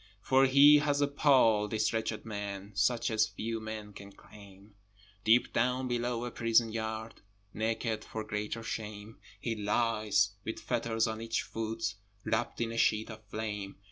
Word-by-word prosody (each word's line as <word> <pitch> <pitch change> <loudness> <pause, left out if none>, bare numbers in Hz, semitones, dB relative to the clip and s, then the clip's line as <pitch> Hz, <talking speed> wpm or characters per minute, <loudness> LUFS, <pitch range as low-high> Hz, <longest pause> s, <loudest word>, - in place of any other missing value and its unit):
For 135 +1 +4
he 140 +3 +8
has 145 -1 +1
a 145 - +3
pall, 130 -7 +4
this 110 +1 0
wretched 110 -1 -2
man, 100 -2 -5
Such 115 +4 +1
as 110 -1 +3
few 115 +1 -4
men 110 -1 -7
can 100 0 -11
claim: 100 0 -16 0.5
Deep 115 +4 +4
down 125 +2 +1
below 120 -1 -1
a 120 - -5
prison 115 -1 +2
yard, 110 0 -5 0.3
Naked 110 +1 -2
for 110 - -5
greater 105 +1 -4
shame, 105 -1 -6 0.2
He 115 +1 -2
lies, 105 -1 +1
with 110 - -4
fetters 115 -2 0
on 110 -1 -3
each 115 0 -1
foot, 115 0 -3 0.3
Wrapt 110 +2 -1
in 115 -1 -1
a 115 - -3
sheet 110 +1 +2
of 110 0 -11
flame! 105 -2 -5
110 Hz, 160 wpm, -31 LUFS, 105-115 Hz, 0.5 s, he